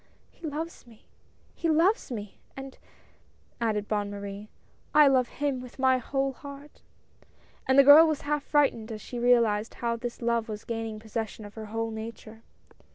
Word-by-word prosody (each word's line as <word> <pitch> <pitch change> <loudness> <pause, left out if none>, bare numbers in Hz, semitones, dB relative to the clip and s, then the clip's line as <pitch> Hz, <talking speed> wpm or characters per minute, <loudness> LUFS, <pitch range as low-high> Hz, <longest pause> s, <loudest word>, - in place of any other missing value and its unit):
" - - -37
He 330 - -8
loves 310 -2 -6
me! 225 -2 -19 0.5
he 335 - -2
loves 335 - +2
me! 210 -4 -7 0.2
and," 270 0 -8 0.9
stdded 210 -2 0
Bonne 205 -1 -1
Marie, 200 +1 -7 0.5
"I 300 0 +8
love 260 -2 +3
him 275 -1 -2
with 250 -1 -12
my 260 -1 +3
whole 270 +2 -1
heart." 280 +2 -12 0.9
And 265 - +3
the 275 - +9
girl 295 +4 +9
was 310 -2 -1
half 295 0 -1
frightened 275 -7 +1
as 215 - -5
she 240 +3 -7
realized 235 -3 +2
how 235 -1 -1
this 240 0 -6
love 235 -1 0
was 210 -1 -6
gaining 225 -2 -4
possession 220 -1 -5
of 205 - -11
her 220 -1 -7
whole 225 +1 -3
nature. 220 0 -8
235 Hz, 170 wpm, -28 LUFS, 220-275 Hz, 0.9 s, the